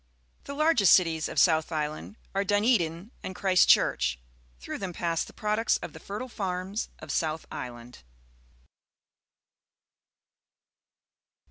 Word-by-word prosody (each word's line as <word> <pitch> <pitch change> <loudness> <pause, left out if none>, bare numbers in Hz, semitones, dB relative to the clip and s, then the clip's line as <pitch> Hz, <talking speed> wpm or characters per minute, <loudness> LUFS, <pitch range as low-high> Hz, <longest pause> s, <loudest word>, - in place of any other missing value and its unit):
The 280 - -6
largest 300 - +5
cities 165 -4 +1
of - - -8
South 160 -2 +3
Island 155 +6 -4 0.2
are 195 +1 +1
Dunedin 205 -2 +1
and 185 - -6
Christchurch. 165 - +3 0.4
Through - - -6
them 190 -3 -4
pass 165 -1 -1
the - - -11
products 215 +1 0
of - - -8
the - - -10
fertile 210 +6 -6
farms 190 -2 -3
of 155 -2 -8
South 160 +1 -1
Island. 120 0 -8
180 Hz, 115 wpm, -28 LUFS, 160-210 Hz, 0.4 s, largest